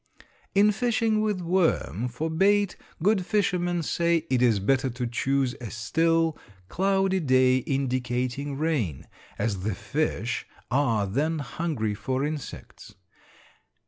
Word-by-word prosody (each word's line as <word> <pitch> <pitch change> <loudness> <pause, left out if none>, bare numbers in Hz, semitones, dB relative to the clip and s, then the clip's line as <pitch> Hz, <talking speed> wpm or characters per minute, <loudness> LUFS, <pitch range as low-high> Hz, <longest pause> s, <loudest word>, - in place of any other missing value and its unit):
In 205 +1 +6
fishing 220 0 +1
with 210 -4 0
worm 165 - +1
for 125 +6 -3
bait, 200 +3 +3 0.3
good 200 -1 +3
fishermen 175 -4 0
say, 170 +1 +1
it 125 -2 +2
is 115 -5 +4
better 130 +6 +1
to 125 0 -4
choose 130 +2 0
a 115 - -5
still, 165 +8 +1 0.3
cloudy 195 0 +1
day 130 -4 +4
indicating 130 +1 -2
rain, 135 - -1 0.3
as 100 -2 -1
the 100 +1 -2
fish 140 -4 -2 0.2
are 120 -6 +2
then 145 +11 0
hungry 140 -6 -2
for 130 +6 -2
insects. 150 -3 -7
145 Hz, 120 wpm, -26 LUFS, 125-175 Hz, 0.3 s, In